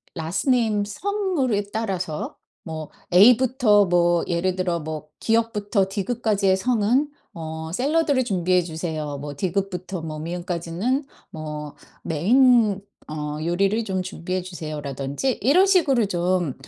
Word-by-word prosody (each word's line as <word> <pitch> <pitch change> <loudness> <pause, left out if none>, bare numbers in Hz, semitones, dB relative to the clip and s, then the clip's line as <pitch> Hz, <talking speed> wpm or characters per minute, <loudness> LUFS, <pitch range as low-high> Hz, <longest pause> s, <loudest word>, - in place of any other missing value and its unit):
라스트 165 - -2
네임, 220 -5 +2
성으로 315 - -1
따라서 185 -8 -3 0.3
뭐 155 -2 -6 0.2
A부터 225 +1 +6
뭐 175 -1 +3
예를 180 +1 0
들어 180 -2 -1
뭐 155 -1 -6
"ㄱ부터 210 -3 +1
ㄷ까지의 200 -1 +1
성은 245 +6 +2 0.2
어 160 -1 -6
샐러드를 285 - +2
준비해 185 -4 +1
주세요. 160 -3 -4
뭐 145 0 -6
ㄷ부터 185 +1 -3
뭐 155 -1 -6
ㅁ까지는 175 - -2 0.3
뭐 150 -1 -7 0.3
메인 215 - +4 0.3
어 150 -1 -4
요리를 195 +6 +1
좀 190 -3 -2
준비해 185 0 -4
주세요."라든지 155 - -4
이런 295 - +5
식으로 305 - +3
좀 180 -5 0
185 Hz, 265 characters per minute, -23 LUFS, 165-230 Hz, 0.3 s, A부터